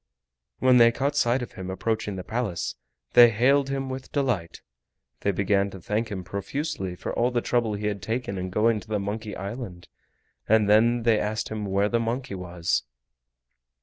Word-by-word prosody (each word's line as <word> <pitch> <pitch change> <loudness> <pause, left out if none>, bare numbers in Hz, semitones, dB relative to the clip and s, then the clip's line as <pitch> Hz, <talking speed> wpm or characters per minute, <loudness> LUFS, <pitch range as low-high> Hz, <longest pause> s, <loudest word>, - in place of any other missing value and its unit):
When 130 -1 +5
they 115 -1 +7
caught 140 +4 -1
sight 125 -2 +2
of 120 - -8
him 95 -1 -7
approaching 105 +2 -2
the 90 - -5
Palace, 110 -7 -2 0.4
they 120 -1 +9
hailed 135 +5 +3
him 135 -1 -2
with 130 0 -6
delight. 120 - -1 0.6
They - - 0
began 100 +1 +1
to 95 - -10
thank 110 +5 -2
him 95 -4 -5
profusely 100 - -4
for - - -5
all 120 +1 +2
the 120 -1 0
trouble 120 -3 0
he 105 +1 -4
had 100 -2 -2
taken 110 +2 -3
in 95 0 -3
going 110 +3 +2
to 105 +2 -3
Monkey 105 +2 -4
Island, 100 -3 -7 0.6
and 110 -1 +4
then 115 +3 +4
they 115 -2 +4
asked 110 +1 -2
him 105 -1 -4
where 100 +1 +2
the 115 +2 +1
monkey 120 +2 -2
was. 90 -2 -1
110 Hz, 180 wpm, -26 LUFS, 100-120 Hz, 0.6 s, they